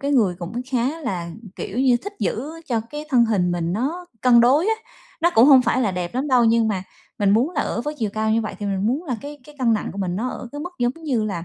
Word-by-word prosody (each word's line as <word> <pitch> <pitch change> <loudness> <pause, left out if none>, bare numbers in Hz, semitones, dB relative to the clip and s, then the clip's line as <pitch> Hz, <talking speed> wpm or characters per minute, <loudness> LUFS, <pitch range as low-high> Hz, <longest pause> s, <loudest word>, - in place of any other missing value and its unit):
cái 280 0 -1
người 215 -10 +3
cũng 230 +8 -5
khá 265 +6 0
là, 180 - -3 0.3
kiểu 210 +6 -5
như, 255 -2 +4
thích 405 - -5
giữ 270 +7 -2 0.2
cho 235 -3 0
cái 295 +1 -6
thân 240 -3 +5
hình 195 -6 +1
mình 170 -1 -1
nó 300 - -2
cân 240 -2 +6
đối 280 - +4
á. 445 - +3 0.5
Nó 345 - +4
cũng 225 - +7
hông 265 -3 +8
phải 255 - +1
là 215 -6 +1
đẹp 180 +1 -4
lắm 270 +4 -1
đâu, 250 -2 +4
nhưng 225 -1 +3
mà 190 -3 -1 0.4
mình 200 -1 +3
muốn 235 +9 +3
là 305 -5 -1
ở - - -2
với 295 +5 -4
chiều 215 -3 -1
cao 220 0 0
như 225 +1 +3
vậy 215 - -4
thì 205 - -4
mình 195 0 -1
muốn 275 +9 0
là 250 -6 -2
cái 290 +1 -8
cái 300 +1 -15
cân 245 -3 +3
nặng 215 - -1
của 200 - -8
mình 180 -2 -2
nó 245 +4 -1
ở 245 - -7
cái 290 - -6
mức 355 - -5
giống 245 +1 +1
như 240 -7 0
là, 175 -5 -3
240 Hz, 285 wpm, -22 LUFS, 210-280 Hz, 0.5 s, hông